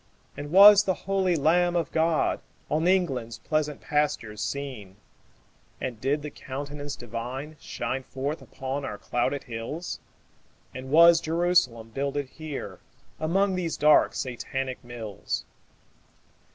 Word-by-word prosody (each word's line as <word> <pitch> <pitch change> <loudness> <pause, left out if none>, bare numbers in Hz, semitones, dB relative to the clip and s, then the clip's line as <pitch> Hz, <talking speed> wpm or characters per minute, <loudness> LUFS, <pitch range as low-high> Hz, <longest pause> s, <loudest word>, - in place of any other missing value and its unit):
And 145 0 -6
was 200 +2 +9
the 190 -2 0
holy 190 -2 +2
Lamb 175 +3 +3
of 165 -5 0
God 160 0 +1 0.3
On 160 +3 +2
England's 135 -12 +1
pleasant 150 -2 -2
pastures 130 -8 -1
seen? 130 -9 -5 0.8
And 120 -4 -5
did 145 +2 0
the 150 - -5
Countenance 145 +2 -6
Divine 125 +6 -6
Shine 130 - -3
forth 135 +4 -4
upon 135 +2 -5
our 105 - -4
clouded 130 +6 -1
hills? 125 +8 -5 0.7
And 130 +1 -7
was 170 +2 +7
Jerusalem 160 -10 +1
builded 140 0 -2
here 155 -2 -7 0.4
Among 190 +5 +2
these 175 -4 -2
dark 150 0 +5
Satanic 130 +1 -4
mills? 115 -4 -5
145 Hz, 120 wpm, -27 LUFS, 130-165 Hz, 0.8 s, was